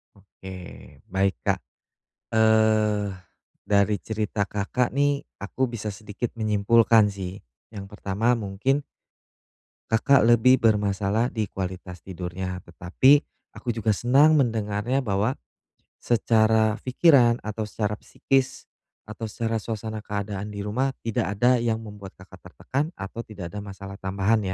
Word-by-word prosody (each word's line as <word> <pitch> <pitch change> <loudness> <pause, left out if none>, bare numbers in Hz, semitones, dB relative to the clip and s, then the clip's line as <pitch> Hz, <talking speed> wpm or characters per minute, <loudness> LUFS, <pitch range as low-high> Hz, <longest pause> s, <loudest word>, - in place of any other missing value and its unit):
Oke, 95 -1 -12 0.6
baik, 95 +1 +1
Kak, - - +1 0.7
eh 110 -2 +3 0.6
dari 100 0 +3
cerita 105 -1 -2
Kakak 105 +6 -1
nih 145 0 +2 0.2
aku 130 +6 -1
bisa 115 -3 -5
sedikit 105 +3 -5
menyimpulkan 110 0 +4
sih, 95 -2 -6 0.4
yang 100 -1 -8
pertama 105 +4 0
mungkin 110 +8 -1 1.1
Kakak 110 +3 +4
lebih 120 +2 +5
bermasalah 105 +1 +2
di 110 -4 -2
kualitas 90 -2 -6
tidurnya, 90 +1 -5
tetapi 95 - +3 0.3
aku - - -11
juga 115 -2 +1
senang 135 +9 +4
mendengarnya 115 -1 0
bahwa 105 +4 0 0.6
secara 110 -1 +2
pikiran 130 -3 +4
atau 110 0 -4
secara 105 0 -2
psikis 130 +5 -1 0.4
atau 110 +1 -7
secara 115 +1 -2
suasana 110 0 -5
keadaan 100 -1 -4
di 100 -1 -6
rumah, 130 +6 -1
tidak 105 -3 -1
ada 120 +3 +3
yang 115 -1 -1
membuat 105 -2 -10
Kakak 95 -1 -15
tertekan 135 - -3
atau 100 +4 -7
tidak 100 -7 -8
ada 105 - -5
masalah 100 -1 -9
tambahan 100 +3 +1
105 Hz, 120 wpm, -25 LUFS, 100-115 Hz, 1.1 s, lebih